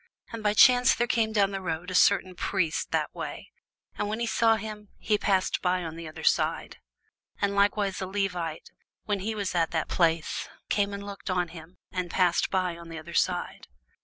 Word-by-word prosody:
And 230 -1 -6
by 210 0 +1
chance 250 +3 +6
there 240 - +1
came 225 -2 +1
down 200 -2 +2
a 180 -1 -3
certain 185 0 +4
priest 170 -3 -1
that - - -1
way: - - -7 0.5
and 205 - 0
when 215 +2 -2
he 235 - 0
saw 225 0 +3
him, 210 -1 -7
he 215 - +1
passed 190 -2 +1
by 180 0 +1
on 160 -1 -6
the 165 -1 -7
other 155 - -9
side. - - +1 0.6
And 200 -1 +1
likewise 200 -1 +1
a 190 - -3
Levite, 180 -5 -3 0.3
when 205 -2 -1
he 220 +3 -3
was 200 -3 -2
at 165 -2 +2
the 160 -2 -1
place, 165 -2 0 0.2
came 205 -1 +1
and 200 0 -7
looked 200 0 -7
on 180 -2 0
him, 165 +1 -12
and 180 -2 -3
passed 180 -1 +2
by 185 -3 0
on 170 0 -11
the 165 - -7
other 165 +2 -9
side. - - -1
190 Hz, 190 wpm, -27 LUFS, 170-210 Hz, 0.6 s, chance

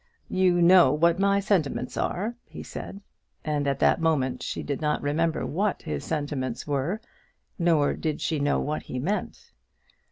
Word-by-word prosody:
"You 180 -2 +3
know 175 -5 +7
what 170 +4 +2
my 200 0 +3
sentiments 180 -10 0
are," 210 +6 -1
he - - -9
said. 200 - -8 0.4
At 145 -3 0
that - - +3
moment 145 -6 +1
she - - -4
did 140 0 -3
not 150 -1 +1
remember 155 +3 0
what 200 +5 -1
his 75 -2 -4
sentiments 145 -5 -3
were, 145 +8 -1 0.6
nor 165 -4 +3
did 155 -2 -3
she 155 - -1
know 145 0 +1
what 150 +1 -2
he 130 - -6
meant. 185 +12 -3
155 Hz, 155 wpm, -26 LUFS, 145-180 Hz, 0.6 s, know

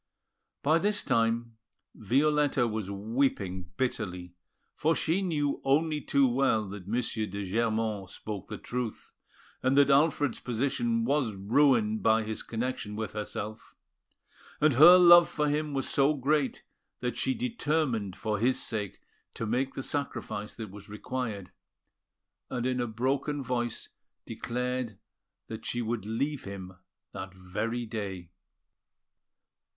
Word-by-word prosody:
By 155 +3 +4
this 205 +2 +1
time, 115 -2 0 0.4
Violetta 140 +3 +2
was 110 -3 -3
weeping 100 -4 -1
bitterly, 90 -8 -3 0.4
for 160 +2 +2
she 170 +5 +1
knew 150 -6 -1
only 150 +2 +2
too 140 -1 +3
well 120 -4 +2
that 95 -2 -8
M. - - -6
de 110 -4 -2
Germont 110 -1 -1
spoke 100 -1 -7
the 105 - -6
truth, 120 -1 -5 0.5
and 130 +2 +2
that 140 0 +6
Alfred's 145 -2 +3
position 140 - 0
was 140 - +1
ruined 110 +1 +3
by 110 0 +3
his 110 0 -4
connection 115 -2 -4
with 110 -1 -4
herself; 105 +1 -6 0.8
and 155 -1 +4
her 165 +8 +9
love 175 -1 +8
for 150 -1 0
him 150 +1 0
was 135 - -1
so 140 +2 +3
great 145 0 0 0.4
that 125 -2 -2
she 260 - 0
determined 150 - -1
for 105 -2 -2
his 125 +4 +2
sake 105 -4 -4 0.3
to 115 - -3
make 130 +5 -1
the 135 - -4
sacrifice 125 -7 -4
that 110 -4 -7
was 105 +1 -12
required, 105 -3 -4 1.0
and 120 -1 -2
in 130 -1 0
a 120 - -1
broken 135 +5 -1
voice 120 -2 -2 0.4
declared 125 -1 -3 0.5
that 110 0 -8
she 120 - -2
would 115 -2 -2
leave 140 +6 -2
him 95 -2 -7 0.4
that 95 0 -7
very 105 +6 -3
day. 95 -6 -5
120 Hz, 135 wpm, -29 LUFS, 105-140 Hz, 1.0 s, her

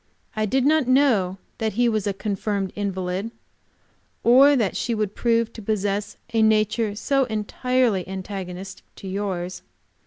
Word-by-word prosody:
I 215 0 0
did 265 +4 +1
not 305 -3 +3
know 240 -9 +3 0.2
that 220 -1 -1
he 240 +3 +2
was 215 -3 0
a - - +2
confirmed 200 -1 -2
invalid, 190 0 -2 0.9
or 270 +5 +7
that 220 -8 0
she 235 - -1
would 210 -2 -1
prove 230 0 +1
to 225 - -9
possess 205 -1 -2 0.2
a 225 - +3
nature 215 0 +2
so 275 +4 +1
entirely 220 -2 0
antagonistic 190 0 -6
to 195 - -9
yours. 190 -2 -3
215 Hz, 145 wpm, -23 LUFS, 195-235 Hz, 0.9 s, or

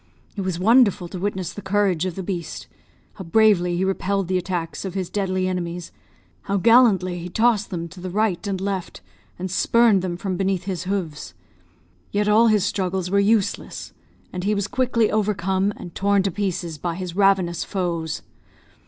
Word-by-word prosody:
It 200 - -3
was 185 -3 -2
wonderful 210 -2 +4
to 185 - -6
witness 185 -2 -3
the 205 - -8
courage 190 -3 +1
of 180 - -5
the 190 - -4
beast. 175 -3 -5 0.5
How 195 - -8
bravely 180 -2 +3
he 190 - +1
repelled 195 -1 -1
the 185 - +2
attacks 175 -2 -4
of 190 -1 -5
his 185 -3 -3
deadly 185 -2 0
enemies, 175 -1 -4 0.6
how 200 - +2
gallantly 200 -5 +4
he 175 +1 -6
tossed 220 +1 +2
them 170 -2 -4
to 185 +1 -12
the 185 - -4
right 205 0 0
and 195 -2 -2
left, 195 -2 -4 0.4
and 185 0 -4
spurned 225 0 +4
them 175 -2 -3
from 185 0 -3
beneath 190 -1 0
his 185 -2 -4
hoofs; 165 - -4 0.8
yet 205 +1 0
all 220 +3 +5
his 210 -3 +3
struggles 185 -2 -2
were 200 - +4
useless, 205 0 0 0.4
and 180 -1 -4
he 210 +2 +1
was 200 0 -1
quickly 235 -1 +1
overcome 200 -2 +1
and 175 - -9
torn 200 0 +2
to 195 - 0
pieces 175 -4 -3
by 170 +1 -2
his 180 -1 -6
ravenous 190 -3 +2
foes. 170 -5 -3
190 Hz, 180 wpm, -23 LUFS, 180-205 Hz, 0.8 s, all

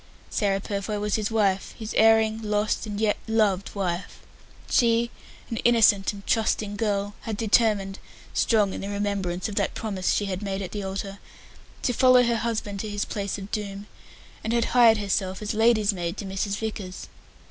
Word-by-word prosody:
Sarah 195 -2 +1
Purfoy 205 +1 -3
was 210 0 -2
his 215 -2 0
wife 200 -4 0
his 220 -1 -6
erring, 220 0 +4
lost 210 +1 -1
and 205 -1 -4
yet 215 -1 +2
loved 210 -4 +1
wife. 180 -2 -3 0.5
She, 235 0 +2 0.4
an 230 - -2
innocent 220 -4 +4
and 200 -1 -11
trusting 215 -2 0
girl, 205 -1 -1
had 220 -2 -4
determined 210 -3 +2 0.3
strong 210 -4 +2
in - - -5
the 195 - -5
remembrance 200 -3 -2
of 210 - -6
that - - 0
promise 195 -4 -1
she 205 - +1
had 190 -1 -3
made 195 -1 -3
at 185 - -6
the 205 - -4
altar 195 +1 -5 0.6
to 245 - +1
follow 255 +1 +6
her 235 -1 +1
husband 215 -3 -3
to 215 - -4
his 205 0 -2
place 200 -1 -3
of 195 0 -9
doom, 200 -1 -4 0.6
and 220 - -1
had 235 -1 +2
hired 235 -3 +7
herself 195 -2 -1
as 210 -1 -3
lady's 220 -1 +3
maid 175 0 -4
to 205 - -5
Mrs. 195 +1 -2
Vickers. 205 -4 -5
205 Hz, 180 wpm, -25 LUFS, 195-220 Hz, 0.6 s, hired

